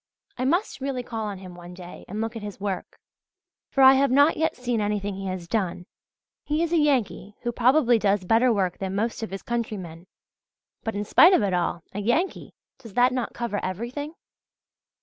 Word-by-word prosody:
I 255 - -2
must 345 +2 0
really 265 -2 -2
call 225 -3 -4
on 200 -2 -5
him 185 -1 -10
one 175 0 -11
day, 180 -1 -11
and 210 +3 -4
look 225 +1 -3
at 225 - -5
his 205 -1 -7
work; 195 -1 -4 0.7
for 270 - +3
I 265 0 +10
have 275 +1 +3
not 285 +5 +5
yet 320 +1 0
seen 245 -3 -1
anything 205 -1 -1
he 195 0 -5
has 185 -2 -5
done. 180 -3 -2 0.6
He 305 +2 0
is 340 0 -2
a - - +4
Yankee 255 -8 0
who 240 - -2
probably 245 0 +4
does 200 -2 +1
better 230 +5 +4
work 190 -5 0
than 190 0 -3
most 225 +4 -1
of 225 - -4
his 195 0 -7
countrymen; 190 -8 -4 0.8
but 225 - -3
in 205 +1 -2
spite 345 - +7
of 295 - +4
it 195 -2 0
all 175 -1 -1
a 205 - -4
Yankee! 245 - -1 0.2
Does 230 -6 -13
that 250 +1 +4
not 250 -2 -3
cover 235 -4 -2
everything? 240 - -5
225 Hz, 200 wpm, -25 LUFS, 195-255 Hz, 0.8 s, I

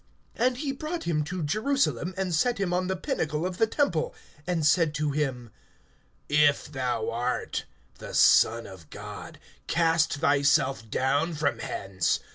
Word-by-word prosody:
(9)And 250 +1 +2
he 280 0 -2
brought 310 +5 -4
him 155 -3 0
to 175 +1 -4
Jerusalem, 215 - 0
and 190 -2 -1
set 235 +10 +2
him 185 -3 0
on 180 +1 0
the 190 - -1
pinnacle 165 - -2
of 180 -1 -4
the 225 - +4
temple, 220 - 0 0.3
and 170 -4 0
said 155 -1 +3
to 150 -1 0
him: 130 -6 -2 0.8
If 145 -1 +3
thou 125 -5 -2
art 120 +2 -2 0.3
the - - -7
Son 115 +1 +5
of 95 -5 -12
God, - - -9 0.3
cast 165 -1 +2
thyself 140 -4 +2
down 145 +8 0
from 150 -1 0
hence. 95 -2 -1
155 Hz, 150 wpm, -27 LUFS, 140-185 Hz, 0.8 s, Son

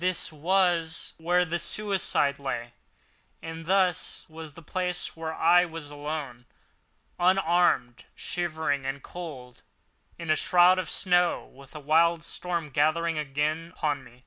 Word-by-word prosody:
This 180 -2 -1
was 170 0 +1
where 175 +2 +2
the 170 0 -2
suicide 190 -10 0
lay; 120 -3 -4 0.7
and 165 0 -8
this 185 -2 +1
was 160 -2 -10
the 165 - -12
place 180 +2 -2
where 160 -1 -4
I 170 +2 +5
was 160 -3 -8
alone—unmanned, 150 +1 -1
shivering 160 -6 -2
with 135 +1 -4
cold 135 -9 -9 0.6
in 165 -2 -2
a - - +5
shroud 180 +2 +5
of 185 - -3
snow 180 -2 +2
with 135 +2 -16
a - - -5
wild 165 +3 +3
storm 170 -4 -3
gathering 155 +3 +1
again 150 +3 -2
upon 145 -3 -1
me! 120 0 -17
165 Hz, 130 wpm, -27 LUFS, 145-175 Hz, 0.7 s, I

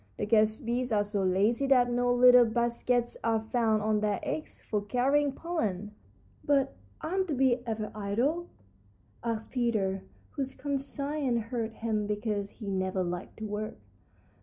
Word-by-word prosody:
The - - -1
guest 215 +2 +2
bees 245 +1 -1
are 210 -1 +3
so 205 -1 -2
lazy 205 +8 +2
that 250 -2 +4
no 245 0 +2
little 245 0 +7
baskets 235 +1 0
are 225 -1 +2
found 220 -1 +1
on 215 0 +2
their 210 -1 0
legs 310 - -4
for 210 -2 -2
carrying 270 +7 +2
pollen." 215 - -3 0.5
"But 275 -2 +2 0.3
aren't 375 +3 -1
the 305 - -1
bees 260 -1 +3
ever 215 -1 -3
idle?" 240 +12 -1 0.8
asked 230 -2 -3
Peter, 215 -7 0 0.3
whose 270 -2 -3
conscience 280 -2 -1
hurt 230 -2 -2
him 220 -2 -1
because 210 -1 -2
he 215 - -11
never 190 -1 0
liked 175 +1 -5
to 220 - -5
work. 210 +1 -4
230 Hz, 150 wpm, -29 LUFS, 210-260 Hz, 0.8 s, little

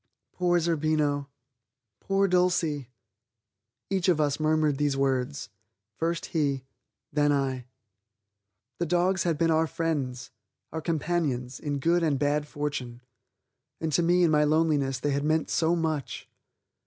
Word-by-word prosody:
"Poor 175 -1 +2
Zerbino; 155 -3 0 0.7
poor 195 0 +1
Dulcie!" 175 -7 +1 1.0
Each 190 -1 +1
of 170 -4 +3
us 145 0 +1
murmured 155 -2 +2
these 145 -2 +1
words; 135 -1 -1 0.4
first 165 +6 -2
he, 140 -5 0 0.5
then 145 0 +3
I. 135 -3 -1 1.1
The 170 - 0
dogs 180 +2 +1
had 165 -3 +1
been 165 +1 +2
our 160 0 +3
friends, 140 -8 -3 0.4
our 160 - -4
companions, 150 -6 -1
in 145 -2 -2
good 170 +5 +2
and 155 -4 +1
bad 145 +1 0
fortune, 140 -5 -4 0.8
and 160 -2 -2
to 175 - +3
me 175 +1 +3
in 165 - +4
my 150 -1 +4
loneliness 150 -4 +1
they 145 +2 -1
had 140 +1 0
meant 155 +1 +1
so 165 +1 +2
much. 160 -4 -3
155 Hz, 135 wpm, -27 LUFS, 140-165 Hz, 1.1 s, in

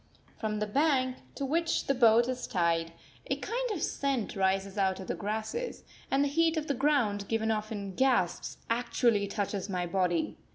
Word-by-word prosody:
From 215 -2 -1
the 210 - 0
bank 260 +2 +2 0.2
to 280 - -2
which 330 +4 0
the 275 - +2
boat 235 -2 +5
is 255 -1 -3
tied 170 -2 +1 0.4
a - - +2
kind - - -3
of 405 -7 -2
scent 275 -6 -1
rises 195 0 +1
out 190 -2 +1
of 190 - -6
the - - -2
grass, 215 - -3 0.5
and 275 +1 +3
the - - +2
heat 325 +3 +2
of 310 - -1
the 285 - 0
ground, 240 -8 +1
given 225 0 0
off 215 0 -2
in 200 -3 -4
gasps, 245 -6 +1
actually 230 -3 +1
touches 200 -1 -3
my 180 -2 -1
body. 175 -2 0
220 Hz, 180 wpm, -30 LUFS, 195-275 Hz, 0.5 s, boat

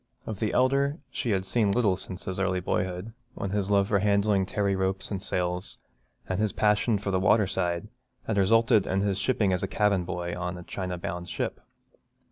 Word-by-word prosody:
Of 110 -3 -5
the 110 - 0
elder 140 +3 +2
she 120 - -2
had 95 -3 +1
seen 105 -1 +2
little 105 -4 +3
since 90 0 -5
his 95 0 -3
early 95 -1 +1
boyhood, 90 +4 -2 0.2
when 100 - -3
his 100 -1 -1
love 100 -1 +3
for 100 - +3
handling 100 -1 +2
tarry 100 -1 0
ropes 95 +1 -2
and 95 -2 -2
sails, 90 -1 -2 0.5
and 95 +1 -1
his 105 -2 +1
passion 105 +1 +2
for 100 0 -3
the 95 - +2
water 105 +2 +4
side, 90 0 -2 0.4
had 110 - -1
resulted 115 +1 +4
in 95 +1 +1
his 100 -1 0
shipping 100 -2 +1
as 90 +2 -1
cabin 105 -3 +2
boy 85 -1 -4
on 90 0 -4
a 90 - -8
China 90 0 -4
bound 85 +1 -5
ship. - - -3
95 Hz, 195 wpm, -27 LUFS, 90-105 Hz, 0.5 s, water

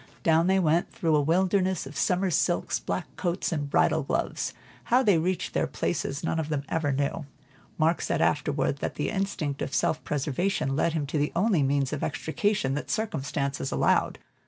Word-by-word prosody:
Down 165 +1 +4
they 190 +1 +4
went, 170 -1 +2
through 170 -9 +1
a 150 - +4
wilderness 185 +3 +1
of 140 +2 -10
summer 180 +5 +1
silks, 175 +2 +1
black 180 - -3
coats, 175 +1 -1
and 145 -3 -2
bridal - - +3
gloves. - - -2 0.3
How 250 +2 +3
they 200 -8 +4
reached 180 +3 -1
their - - +1
places 140 +3 -2
none 165 0 0
of 155 -1 -3
them 145 -2 -1
ever 160 -3 0
knew; 140 +2 -2 0.5
Mark 165 +2 +2
said - - -1
afterward, 145 -1 +1
that - - -3
the 145 - -2
instinct 190 -8 -2
of 135 - -2
self 155 - +1
preservation 145 +1 -1
led 160 +2 +1
him 155 -3 -1
to 145 +2 -2
the 145 - 0
only 190 -2 +3
means 140 0 +1
of 150 - -3
extrication 160 0 0
that 145 - -4
circumstances 140 -9 -2
allowed. - - +2
160 Hz, 180 wpm, -27 LUFS, 145-185 Hz, 0.5 s, Down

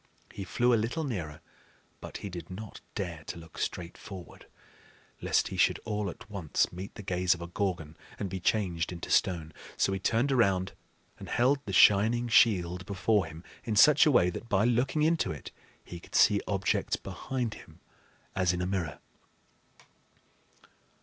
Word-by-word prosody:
He 100 - -5
flew 120 +5 +2
a 115 - +3
little 160 +8 -2
nearer; 90 - -4 0.6
but - - -7
he - - -4
did 85 -1 -7
not 100 +3 -8
dare 85 -6 -4
to - - -5
look 85 0 -12
straight 85 -1 -3
forward, 95 -4 -11 0.7
lest - - +1
he - - -6
should - - +3
all 105 -2 -2
at 90 - -10
once 95 -8 -1
meet 95 +3 -8
the 105 - -8
gaze 90 -1 +1
of 85 - -11
a - - -4
Gorgon, 85 -4 -3 0.2
and 100 - -3
be 95 0 -5
changed 90 -4 0
into 85 -1 -6
stone. 80 -4 +1 0.2
So 95 - +2
he 95 - -2
turned 115 +7 +1
around, 95 -7 +2 0.5
and - - -9
held 130 +4 +3
the - - -3
shining 110 +5 +5
shield 90 -6 +4
before 100 -1 +1
him 80 +2 -10 0.2
in 110 -3 -2
such 150 +8 +7
a - - +5
way 90 -9 +4
that 115 +6 -8
by 100 +2 +3
looking 125 +5 +1
into 160 - +2
it 75 - -8 0.3
he 85 - -8
could - - -12
see 100 -1 +5
objects 95 -1 0
behind 125 -4 -4
him - - -14 0.6
as 90 -2 +2
in 90 - -2
a - - 0
mirror. 90 -6 -2
95 Hz, 175 wpm, -29 LUFS, 90-115 Hz, 0.7 s, such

